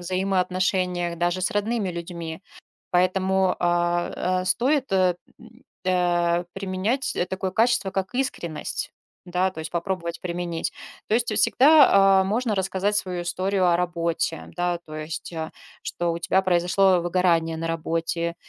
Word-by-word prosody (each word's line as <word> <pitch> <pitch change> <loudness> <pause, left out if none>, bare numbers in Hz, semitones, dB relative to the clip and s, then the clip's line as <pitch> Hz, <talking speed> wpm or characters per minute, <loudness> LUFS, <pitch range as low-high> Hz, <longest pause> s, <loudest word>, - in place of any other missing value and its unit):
взаимоотношениях 185 -1 0
даже 175 +1 0
с 185 - 0
родными 205 -1 -1
людьми. 170 0 -6 0.5
Поэтому, 185 +1 +2
а, 175 +1 0
э, - - -8
стоит, 260 +6 +1
э, 185 -2 +3 0.2
м, 235 +2 -17 0.2
э, 175 -1 +1
применять, 195 +7 -2
э, 175 - 0
такое 190 +1 -3
качество, 220 -2 +2
как 195 +5 -3
искренность, 170 - -3 0.3
да, 180 +1 0
то 160 - -9
есть 160 - -6
попробовать 170 -1 -3
применить. 175 -2 -3 0.4
То 220 - +2
есть 235 -2 0
всегда, 200 -5 +6
а, - - +1
можно 220 +2 0
рассказать 190 +2 0
свою 180 -4 -1
историю 185 +1 0
о 170 - +4
работе, 170 -2 -1
да, 175 -1 -1
то 155 - -9
есть, 155 +2 -6
э, 160 -1 -4 0.3
что 175 -1 -2
у 170 - -4
тебя 190 +3 +2
произошло 185 +1 +3
выгорание 170 -2 +1
на 165 +1 -3
работе. 165 +1 -2
180 Hz, 145 wpm, -24 LUFS, 170-195 Hz, 0.5 s, всегда